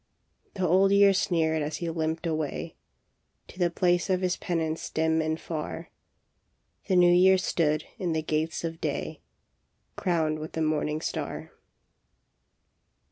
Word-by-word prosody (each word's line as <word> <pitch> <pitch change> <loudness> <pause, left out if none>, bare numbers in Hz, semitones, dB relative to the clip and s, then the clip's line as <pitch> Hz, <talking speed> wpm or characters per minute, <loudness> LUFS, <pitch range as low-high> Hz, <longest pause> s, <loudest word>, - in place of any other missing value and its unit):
" - - -42
The 190 -2 0
Old 190 +3 +4
Year 200 0 +6
sneered 160 -5 +1
as 150 +1 -3
he 170 - -4
limped 160 0 -2
away 155 -3 -3 0.7
To 180 - -13
the 175 -1 +3
place 175 +1 +1
of 185 -1 +1
his 180 -1 +1
penance 160 -2 -3
dim 160 0 +1
and 160 0 -2
far. 155 -3 -6 1.0
The 190 - +2
New 175 -1 +6
Year 190 +2 +6
stood 155 -5 0 0.2
in 175 -3 -1
the 160 0 -1
gates 155 +2 -2
of 165 0 -5
day, - - -3 0.8
Crowned 160 -4 0
with 155 +1 -7
the 160 - -2
morning 155 0 -1
star. - - -4
165 Hz, 145 wpm, -27 LUFS, 155-180 Hz, 1.0 s, Year